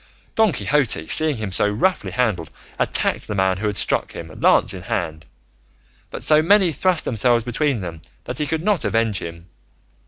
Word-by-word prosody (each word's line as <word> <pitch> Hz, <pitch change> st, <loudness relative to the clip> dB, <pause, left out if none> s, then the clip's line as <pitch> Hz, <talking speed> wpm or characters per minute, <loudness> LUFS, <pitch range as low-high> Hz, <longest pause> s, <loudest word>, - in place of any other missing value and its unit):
Don 220 Hz, -3 st, +3 dB
Quixote, 135 Hz, -, 0 dB
seeing 155 Hz, -, +2 dB
him 105 Hz, -3 st, -4 dB
so 105 Hz, +2 st, +3 dB
roughly 155 Hz, -, 0 dB
handled, 105 Hz, -10 st, -1 dB, 0.3 s
attacked -, -, +1 dB
the 105 Hz, -, -4 dB
man 95 Hz, -1 st, +1 dB
who 105 Hz, +2 st, -2 dB
had 105 Hz, -, -2 dB
struck -, -, -1 dB
him -, -, -8 dB
lance -, -, +4 dB
in -, -, -8 dB
hand, 80 Hz, +1 st, -4 dB, 0.8 s
but -, -, -7 dB
so 155 Hz, 0 st, +5 dB
many 190 Hz, +1 st, +4 dB
thrust 180 Hz, +1 st, 0 dB
themselves 120 Hz, 0 st, +1 dB
between 125 Hz, 0 st, -1 dB
them 85 Hz, -3 st, -7 dB, 0.2 s
that -, -, -5 dB
he 150 Hz, -, -1 dB
could 160 Hz, +2 st, -2 dB
not 205 Hz, -2 st, +1 dB
avenge 115 Hz, -4 st, 0 dB
him. 85 Hz, 0 st, -8 dB
115 Hz, 180 wpm, -21 LUFS, 95-155 Hz, 0.8 s, so